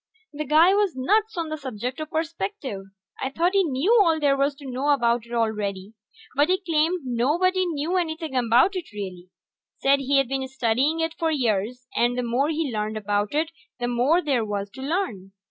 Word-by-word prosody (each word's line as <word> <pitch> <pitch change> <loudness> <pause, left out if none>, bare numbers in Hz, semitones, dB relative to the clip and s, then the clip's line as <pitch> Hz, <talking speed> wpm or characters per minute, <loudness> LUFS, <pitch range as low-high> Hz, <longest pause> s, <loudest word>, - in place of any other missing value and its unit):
The 305 +1 -4
guy 315 +6 +5
was 405 -5 +1
nuts 415 +11 +1
on 330 -2 -2
the 310 0 -4
subject 255 0 -5
of 310 0 -5
perspective. 320 - -4 0.4
I 265 - -1
thought 340 +7 0
he 395 -1 +4
knew 335 - +2
all 330 -4 +3
there 285 -2 +3
was 280 +1 +1
to 280 - -13
know 265 +2 -2
about 235 -4 +2
it - - -16
already, 210 -3 -2 0.4
but 290 +4 +3
he 370 - +3
claimed 335 -1 +1
nobody 340 +10 +1
knew 330 +3 -1
anything 320 -4 -3
about 250 - +3
it, 355 -8 -5
really. 185 -4 -7 0.5
Said 275 +1 +3
he'd 275 -1 +2
been 265 +1 -2
studying 265 +5 0
it 325 0 -1
for 330 - +1
years, 245 -3 -1
and 240 +1 +2
the 250 - 0
more 245 +5 +1
he 310 -5 -1
learned 215 0 -2
about 205 +3 -1
it 320 +2 0 0.3
the 245 - -1
more 255 +9 +2
there 265 -6 +1
was 205 -1 -4
to 265 - -10
learn. 265 - -3
275 Hz, 195 wpm, -24 LUFS, 235-325 Hz, 0.5 s, guy